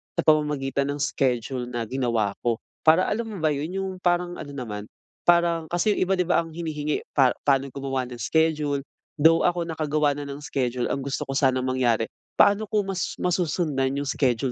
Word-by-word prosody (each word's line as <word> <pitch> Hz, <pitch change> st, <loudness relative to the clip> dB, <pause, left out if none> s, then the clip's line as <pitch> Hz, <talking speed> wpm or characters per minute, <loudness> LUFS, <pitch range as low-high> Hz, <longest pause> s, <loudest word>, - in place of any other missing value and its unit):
sa 170 Hz, -, 0 dB
pamamagitan 145 Hz, -3 st, +2 dB
ng -, -, -8 dB
schedule 125 Hz, -2 st, -1 dB
na 120 Hz, -1 st, -3 dB
ginawa 115 Hz, -4 st, 0 dB
ko. 120 Hz, -1 st, +1 dB, 0.3 s
Para 165 Hz, +4 st, +7 dB
alam 225 Hz, +2 st, -1 dB
mo 215 Hz, -, -6 dB
ba 155 Hz, -, +3 dB
'yon, 150 Hz, +6 st, -3 dB
yung 190 Hz, -, -3 dB
parang 175 Hz, 0 st, 0 dB
ano 145 Hz, -, -7 dB
naman, 105 Hz, -5 st, -5 dB, 0.4 s
parang 170 Hz, -2 st, +3 dB
kasi 175 Hz, +6 st, +1 dB
'yong -, -, 0 dB
iba, 195 Hz, -, +2 dB
'di 180 Hz, -, +1 dB
ba, 175 Hz, 0 st, +2 dB
ang 165 Hz, -1 st, -10 dB
hinihingi 150 Hz, -3 st, -2 dB
pa 135 Hz, -3 st, +3 dB
paano 140 Hz, -1 st, +2 dB
gumawa 135 Hz, -2 st, -2 dB
ng 125 Hz, -, -8 dB
schedule 150 Hz, +1 st, +1 dB, 0.4 s
though 165 Hz, +2 st, +5 dB
ako 175 Hz, -1 st, 0 dB
nakagawa 155 Hz, -2 st, 0 dB
na 145 Hz, 0 st, -5 dB
ng 140 Hz, +1 st, -7 dB
schedule, 125 Hz, -3 st, -1 dB
ang 140 Hz, -, -1 dB
gusto 135 Hz, 0 st, -2 dB
ko -, -, -3 dB
sanang 130 Hz, -2 st, +2 dB
mangyari 120 Hz, -3 st, +1 dB, 0.3 s
paano 205 Hz, +2 st, +5 dB
ko 210 Hz, -, +1 dB
mas 190 Hz, -2 st, -2 dB
masusundan 160 Hz, -6 st, 0 dB
'yong 140 Hz, 0 st, -2 dB
schedule 130 Hz, -2 st, +1 dB
145 Hz, 190 wpm, -25 LUFS, 130-170 Hz, 0.4 s, Para